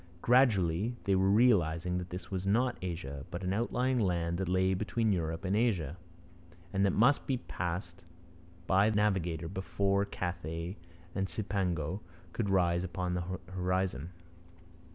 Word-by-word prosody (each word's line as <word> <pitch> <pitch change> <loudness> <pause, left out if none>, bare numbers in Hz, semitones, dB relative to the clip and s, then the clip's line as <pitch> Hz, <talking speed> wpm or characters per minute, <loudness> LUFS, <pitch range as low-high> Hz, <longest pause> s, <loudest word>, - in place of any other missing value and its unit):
Gradually 115 -4 +3
they 100 - +2
were 95 0 +3
realizing 90 -6 +3
that 90 0 -6
this 90 +2 -7
was 95 0 -2
not 120 +5 +2
Asia, 80 -6 -5
but 90 +2 -5
an 90 +1 0
outlying 125 +4 +1
land 85 -4 0
that 95 -2 -1
lay 95 +1 +3
between 110 +3 0
Europe 80 0 -2
and 95 +2 +1
Asia 95 - +1 0.8
and 100 0 +2
that 100 - +4
must 125 +6 +3
be 135 - +1
passed 90 -4 -4 0.6
by 95 +4 +4
the 110 - -1
navigator 90 -6 +1
before 100 +2 0
Cathay 90 -2 -4 0.4
and 95 0 -1
Cipango 95 -5 -2 0.3
could 105 -4 -1
rise 90 -2 +2
upon 90 -1 -2
the 90 +1 -2
horizon. 90 -3 -1
95 Hz, 145 wpm, -32 LUFS, 85-100 Hz, 0.8 s, that